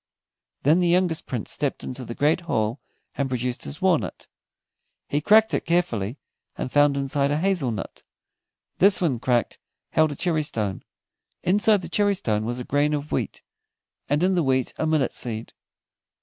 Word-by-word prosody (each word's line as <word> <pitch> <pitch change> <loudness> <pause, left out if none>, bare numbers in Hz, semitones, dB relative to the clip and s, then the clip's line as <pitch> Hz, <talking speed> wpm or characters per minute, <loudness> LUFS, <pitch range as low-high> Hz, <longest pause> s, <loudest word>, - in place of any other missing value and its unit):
Then 155 +5 +4
the 175 - +2
youngest 175 -2 +2
Prince 120 -5 -4
stepped 145 -2 -2
into 130 0 -6
the 120 0 -7
great 150 +4 +2
hall 120 -6 -1 0.4
and 140 -1 -1
produced 125 -1 -2
his 70 - -7
walnut. - - 0 0.8
He 145 - -1
cracked 220 +6 +5
it - - 0
carefully, 140 - 0 0.4
and 130 - -4
found 145 -1 +4
inside 140 0 0
a 145 - +1
hazel 175 -6 +1
nut. 110 -4 -6 0.8
This 195 +1 +5
when 145 -10 0
cracked 120 -2 0 0.3
held 155 -1 +3
a - - -5
cherrystone, 145 - -1 0.6
inside 205 +2 +3
the - - -5
cherrystone 175 - +1
was 120 +1 -3
a - - -4
grain 145 +3 +1
of 145 +1 -5
wheat, - - -3 0.7
and 145 +4 +2
in 190 +1 +3
the 180 - +2
wheat 130 -3 +1
a 160 - +1
millet 155 -5 +1
seed. 115 -1 -5
145 Hz, 165 wpm, -24 LUFS, 125-175 Hz, 0.8 s, cracked